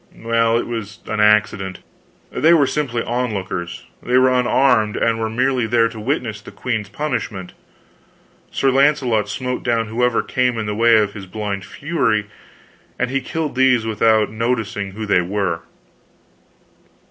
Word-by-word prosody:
"Well, 115 0 +1
it - - -1
was 110 -3 -5
an 110 -1 -3
accident. 105 -3 +2 0.5
They 165 +2 +4
were 145 -4 +4
simply 130 -5 -2
onlookers; 100 -8 -3 0.2
they 125 +1 +1
were 130 0 +4
unarmed, 125 -3 +2
and 115 -1 +1
were 110 0 -1
merely 125 +1 0
there 115 0 +3
to 115 -1 -9
witness 115 -3 -2
the - - -11
queen's 110 -5 -3
punishment. 105 -7 -4 1.0
Sir 135 - +1
Launcelot 130 -6 +2
smote 125 +3 -3
down 115 -2 0
whoever 125 +1 +1
came 125 -2 0
in 110 - -2
the 105 - -2
way 115 +1 +4
of 105 -2 +1
his 95 -2 -9
blind 100 -1 -4
fury, 145 -9 -1 0.7
and 125 0 -1
he 135 0 0
killed 155 +2 -3
these 130 -3 +3
without 110 -1 +2
noticing 110 -3 -2
who 110 +2 -5
they 100 -3 +3
were. 90 -2 -1
115 Hz, 150 wpm, -19 LUFS, 105-125 Hz, 1.0 s, They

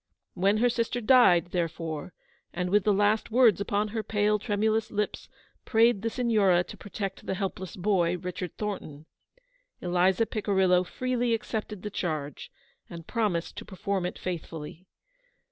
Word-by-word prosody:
When 195 +3 +2
her 245 +3 +3
sister 235 0 -1
died, 210 -8 +5
therefore, 165 -2 -3 0.4
and 180 0 -2
with 205 -1 +3
the 210 - +4
last 205 +2 +2
words 230 -4 +4
upon 205 +1 0
her 220 +1 -2
pale, 210 0 +1
tremulous 215 +1 0
lips 210 0 -3 0.3
prayed 225 -2 +3
the 230 - -1
Signora 210 -7 +3
to - - -10
protect 195 -1 -6
the 190 - -1
helpless 190 -2 -4
boy, 180 -2 +1
Richard 180 0 -6
Thornton, 160 -8 -5 0.7
Eliza 180 +4 +2
Picirillo 190 -4 +2
freely 245 0 0
accepted 215 -3 -5
the 210 - -4
charge, 155 -7 -4 0.4
and 165 -1 -9
promised 205 -7 -1
to - - -5
perform 190 -1 -2
it - - -7
faithfully. 165 0 -6
200 Hz, 145 wpm, -28 LUFS, 180-220 Hz, 0.7 s, died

